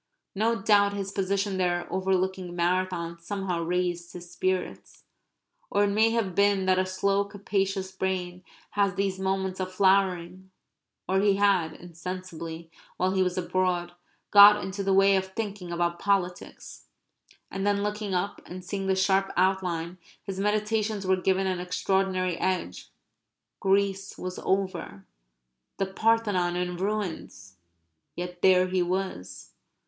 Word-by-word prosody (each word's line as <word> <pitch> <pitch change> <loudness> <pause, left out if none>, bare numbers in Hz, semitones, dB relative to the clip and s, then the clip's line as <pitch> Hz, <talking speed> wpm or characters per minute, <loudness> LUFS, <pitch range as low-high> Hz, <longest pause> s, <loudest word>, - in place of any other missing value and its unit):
No 225 +3 +1
doubt 205 -1 +4
his 195 -1 -4
position 195 0 -1
there 175 -1 0
overlooking 190 -1 -1
Marathon 175 -1 -1
somehow 185 -1 -3
raised 175 0 -2
his 175 -1 -10
spirits. 185 0 -3 0.7
Or 205 - +2
it 200 - +2
may 220 +2 +4
have 225 -5 -1
been 200 0 +3
that 185 0 +3
a 185 - 0
slow 195 +1 +1
capacious 195 -1 -2
brain 185 -1 -3 0.3
has 200 -3 +1
these 195 -1 -1
moments 190 0 -1
of 185 0 -3
flowering. 190 -1 +1 0.6
Or 190 +1 +2
he 200 0 +3
had, 195 -5 +2
insensibly, 170 -1 -7 0.3
while 185 +1 +1
he 190 0 +1
was 180 -1 0
abroad, 180 -1 0 0.4
got 205 0 +9
into 190 +1 -4
the 195 0 0
way 195 +1 +5
of 190 0 -2
thinking 200 -5 -4
about 170 0 -1
politics. 190 -3 -2 0.6
And 195 - -3
then 200 0 +1
looking 210 -2 -2
up 190 +3 -2
and 180 0 -8
seeing 195 0 -3
the 190 - +2
sharp 195 0 +2
outline, 180 -2 0 0.2
his 195 -1 -5
meditations 210 0 0
were 190 0 +3
given 190 +1 +1
an 185 -1 -1
extraordinary 185 0 0
edge; 185 - -2 0.7
Greece 195 0 0
was 185 0 -5
over; 185 - -2 0.7
the 195 - 0
Parthenon 195 -3 +1
in 180 0 -2
ruins; 180 - -4 0.6
yet 180 0 -6
there 185 -1 +5
he 185 0 0
was. 180 - -4
190 Hz, 140 wpm, -27 LUFS, 180-200 Hz, 0.7 s, got